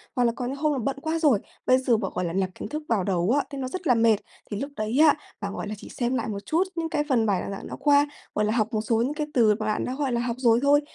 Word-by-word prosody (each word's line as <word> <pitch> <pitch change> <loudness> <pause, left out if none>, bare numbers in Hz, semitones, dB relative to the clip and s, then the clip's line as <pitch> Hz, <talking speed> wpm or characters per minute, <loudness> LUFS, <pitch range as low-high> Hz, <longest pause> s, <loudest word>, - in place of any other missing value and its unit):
hoặc 250 - +2
là 235 - +3
có 250 - -4
những 260 +3 -3
hôm 300 +1 +1
là 275 - -1
bận 270 +4 -2
quá 320 +2 -1
rồi, 285 -10 +4 0.3
bây 255 - +5
giờ 255 -3 +2
bạn, 195 -3 -3
gọi 180 - -1
là, 165 - -3
nạp 190 0 0
kiến - - -7
thức 305 +1 -4
vào 220 -5 +2
đầu 180 +1 +1
á, - - +3
thì 280 - -7
nó 260 -1 -3
rất 355 +5 -5
là 245 - +5
mệt. 230 0 +4 0.4
Thì 205 - -2
lúc 280 +1 -4
đấy 215 +5 -1
á, 310 -1 +7 0.3
bạn, 200 0 -3
gọi - - -5
là, 210 - -4
chỉ - - -11
xem 245 +1 -1
lại 235 - -1
một 200 -2 -5
chút 330 +4 +2
những 330 -1 -2
cái 300 -2 0
phần 235 -4 +3
bài 195 -4 +1
giảng 195 - -7
đã - - -6
qua, 290 0 +4 0.3
gọi 210 - +2
là, 210 - +1
học 225 0 0
một 215 - +1
số 225 +1 0
những 260 +5 0
cái 300 0 -3
từ 220 -4 +4
mà 215 - -2
bạn 215 0 0
đã, 255 - -3
gọi 280 -2 -1
là, 235 0 0
học 240 -1 -2
rồi 235 -2 +4
thôi. 285 +1 +5
245 Hz, 330 wpm, -25 LUFS, 215-285 Hz, 0.4 s, á